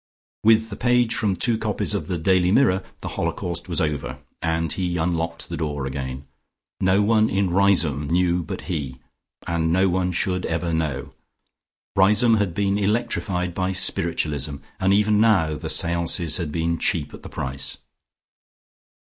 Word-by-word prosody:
With 110 0 +4
the - - -4
page 120 0 +2
from 100 -3 0
two 110 +5 +3
copies 105 -1 -1
of 100 - -3
the 90 -3 -2
"Daily 90 +2 +2
Mirror" 100 -5 +3 0.2
the - - -5
holocaust 85 +1 -3
was 85 - -1
over, 65 -5 -2 0.2
and 80 -1 -1
he 90 -2 -2
unlocked 85 0 -2
the 85 - -5
door 75 -3 -3
again. 65 0 -5 0.5
No 95 +2 +3
one 110 +1 +3
in 95 -2 0
Riseholme 85 -7 +2
knew 90 +1 +1
but 80 - -6
he, 70 -7 -4 0.5
and 80 -1 0
no 95 +2 +3
one 90 0 0
should 90 +1 -1
ever 80 +1 -2
know. 80 -5 -2 0.8
Riseholme 105 +4 +5
had 95 -5 -1
been 100 0 0
electrified 100 -4 -1
by 95 +1 -1
spiritualism, 75 -5 +1 0.2
and 95 0 +2
even 105 +1 +3
now 95 -9 +3
the 75 - -6
seances 85 -1 +1
had 85 -5 -4
been 85 +1 -1
cheap - - -1
at - - -10
the - - -10
price. 65 +1 -3
90 Hz, 155 wpm, -23 LUFS, 80-100 Hz, 0.8 s, Riseholme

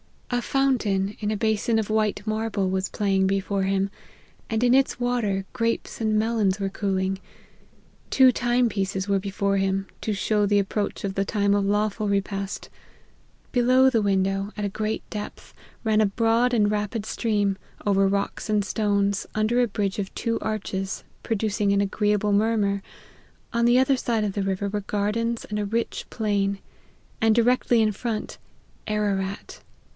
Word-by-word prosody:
A 245 - +1
fountain, 215 -8 +1
in 210 - -2
a 215 - -1
basin 220 +1 +1
of 220 -2 -1
white 215 -1 0
marble, 215 -3 -1
was 190 0 -1
playing 195 -2 +1
before 195 0 0
him, 195 0 0 0.6
and 225 +1 0
in 245 0 +4
its 270 -1 +3
water 230 -6 0
grapes 230 -1 -2
and 215 -1 +2
melons 215 -3 +1
were 195 -1 -1
cooling; 190 -1 -1 0.9
two 260 -1 +6
time 245 0 +2
pieces 195 -2 -2
were 200 -1 +2
before 200 0 -1
him, 195 0 0
to 215 - -2
show 210 +1 +1
the 205 0 +3
approach 200 +1 -1
of 195 -1 -2
the 195 0 0
time 200 -1 +1
of 200 -1 +2
lawful 210 +1 0
repast: 195 0 -2 0.8
below 255 +1 +5
the 230 -4 +2
window, 195 0 0
at 210 - -3
a - - 0
great 215 +2 -3
depth, 210 -1 -7 0.3
ran 220 -1 +3
a - - +5
broad 230 +4 +2
and 210 -3 +3
rapid 210 +1 -2
stream, 205 -4 0 0.3
over 195 -1 +3
rocks 200 +2 -2
and 210 -1 +2
stones, 200 -1 0
under 215 +3 +2
a 245 - +3
bridge 200 -2 -2
of 195 -1 -4
two 230 -1 -1
arches, 195 -3 -3 0.2
producing 210 -2 0
an 200 - +3
agreeable 210 +1 +1
murmur: 205 -1 +2 0.7
on 235 0 +2
the 240 +1 +5
other 265 +1 +3
side 230 -3 0
of 205 -2 -1
the 200 - -1
river 195 +1 -1
were 205 +1 -2
gardens, 215 +4 -1
and 210 0 -3
a 205 - -1
rich 230 +3 -2
plain; 200 -2 0 0.6
and 220 -1 +4
directly 240 0 +3
in 215 -1 +3
front, 215 +1 -4 0.5
Ararat. 200 -2 -2
210 Hz, 165 wpm, -25 LUFS, 195-225 Hz, 0.9 s, two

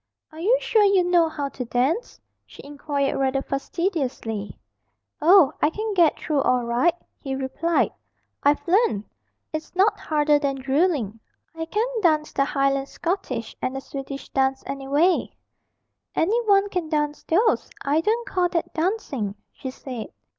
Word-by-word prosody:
'Are 310 - -11
you 440 +9 +3
sure 445 -3 +2
you 395 -2 +4
know 350 -2 +3
how 290 -3 -3
to 265 - -5
dance?' 260 - -1 0.3
she - - -13
inquired 285 -1 -2
rather 270 0 +1
fastidiously. 275 - -3 0.6
'Oh, 340 -2 +6
I 300 - +4
can 430 +5 -3
get 340 -5 +4
through 295 -3 0
all 250 -2 +2
right,' 255 +9 +1 0.2
he 270 -2 -4
replied. 270 +6 0 0.5
'I've 290 +5 +2
learnt. 340 - +2 0.5
It's 310 +2 -5
not 410 +3 +3
harder 295 -1 +2
than 280 -2 -1
drilling. 270 - 0 0.3
I 325 0 -4
can 425 +7 0 0.2
dance 310 -4 +2
the 275 - +2
Highland 275 -1 0
Schottische 275 - -3
and 260 - -2
the - - -2
Swedish 275 0 -7
dance, 265 0 0
any 275 -1 -5
way.' 320 +7 +2 0.8
'Any 430 +9 +2
one 400 0 +5
can 360 -5 -3
dance 295 -1 -1
those. 425 +8 +2 0.2
I 295 +3 +2
don't 460 +6 0
call 360 -1 +1
that 335 -2 -2
dancing,' 315 - -2 0.2
she 265 - -7
said. 255 -3 -7
300 Hz, 155 wpm, -24 LUFS, 270-355 Hz, 0.8 s, Oh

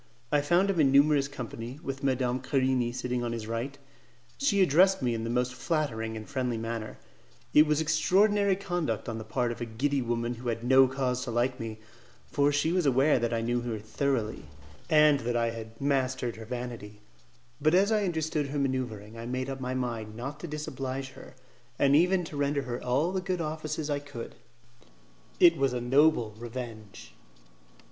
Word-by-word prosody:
I 145 - +3
found 175 +6 +3
him 180 - -2
in 140 -3 +5
numerous 140 0 +4
company, 125 -1 -7
with 135 -2 -5
Madame 130 -2 +1
Querini 130 -2 +1
sitting 125 0 -2
on 120 -1 -2
his 115 -2 -4
right. 115 +5 -4 0.6
She 205 -9 +3
addressed 185 +1 +4
me 120 -2 +1
in 115 -1 -3
the 115 - -3
most 125 +1 0
flattering 115 -8 -2
and 110 - -8
friendly 130 -4 -2
manner; 115 -1 -5 0.6
it 150 +1 +7
was 150 0 +2
extraordinary 195 +6 +3
conduct 175 - -2
on 115 -1 -4
the - - -6
part 120 +2 -1
of 120 - -7
a - - -1
giddy 135 +5 -1
woman 120 0 -1
who 120 +1 -8
had 115 0 -3
no 130 +1 +6
cause 130 -1 -1
to - - -5
like 120 +2 0
me, 110 -1 -5 0.5
for 145 0 +2
she 145 +3 +1
was 180 -4 +1
aware 135 +1 +4
that 120 0 -1
I 115 -1 0
knew 120 +1 0
her 120 -2 -3
thoroughly, 110 - -2 0.4
and 150 -3 +5
that 120 0 -1
I 115 -1 +1
had 115 0 -9
mastered 130 -3 0
her 110 - -8
vanity; 115 -3 -6 0.6
but 155 +3 +4
as 200 +4 +4
I 215 -1 +2
understood 160 -4 -1
her 145 +2 -4
manoeuvring 120 -6 -3
I 115 - -6
made 130 +2 -3
up 135 -1 -6
my 130 0 -2
mind 115 -4 -3
not 135 +5 -6
to 175 - -6
disoblige 135 -3 -4
her, - - -13 0.4
and 140 0 +4
even 180 +3 +4
to 160 - -8
render 140 0 0
her 120 -2 -5
all 140 +8 +1
the 190 -1 -1
good 185 -1 -2
offices 155 -1 -3
I 145 -1 -1
could; 140 -5 -8 1.1
it 170 -2 +7
was 135 -2 +1
a 125 - -1
noble 125 -2 +3
revenge. 115 -4 -8
130 Hz, 190 wpm, -29 LUFS, 120-150 Hz, 1.1 s, it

